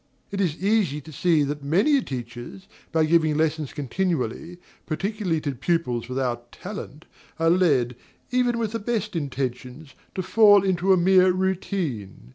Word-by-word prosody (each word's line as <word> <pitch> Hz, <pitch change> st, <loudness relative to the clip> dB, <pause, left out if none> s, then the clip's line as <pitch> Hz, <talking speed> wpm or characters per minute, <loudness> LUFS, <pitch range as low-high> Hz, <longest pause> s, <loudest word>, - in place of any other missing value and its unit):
It 200 Hz, 0 st, -2 dB
is 170 Hz, -5 st, 0 dB
easy 195 Hz, -7 st, +1 dB
to 155 Hz, +2 st, -12 dB
see 160 Hz, +1 st, +2 dB
that 145 Hz, +1 st, -3 dB
many 205 Hz, -, +3 dB
teachers, 120 Hz, -, -7 dB, 0.2 s
by 160 Hz, -1 st, +3 dB
giving 155 Hz, -2 st, +3 dB
lessons 155 Hz, -2 st, 0 dB
continually, 160 Hz, +1 st, -2 dB, 0.3 s
particularly 190 Hz, 0 st, -1 dB
to 145 Hz, -3 st, -2 dB
pupils 130 Hz, -4 st, -1 dB
without 125 Hz, -2 st, -3 dB
talent, 180 Hz, -6 st, -8 dB, 0.3 s
are 165 Hz, 0 st, +3 dB
led, 140 Hz, -10 st, +2 dB, 0.4 s
even 245 Hz, -1 st, +2 dB
with 225 Hz, -3 st, -1 dB
the 230 Hz, -, -3 dB
best 215 Hz, -2 st, -2 dB
intentions, 135 Hz, -1 st, -4 dB, 0.2 s
to 185 Hz, -, -2 dB
fall 205 Hz, -1 st, +6 dB
into 190 Hz, 0 st, +1 dB
a 190 Hz, -, +6 dB
mere 185 Hz, +1 st, +5 dB
routine. 180 Hz, -, -3 dB
165 Hz, 145 wpm, -24 LUFS, 140-190 Hz, 0.4 s, fall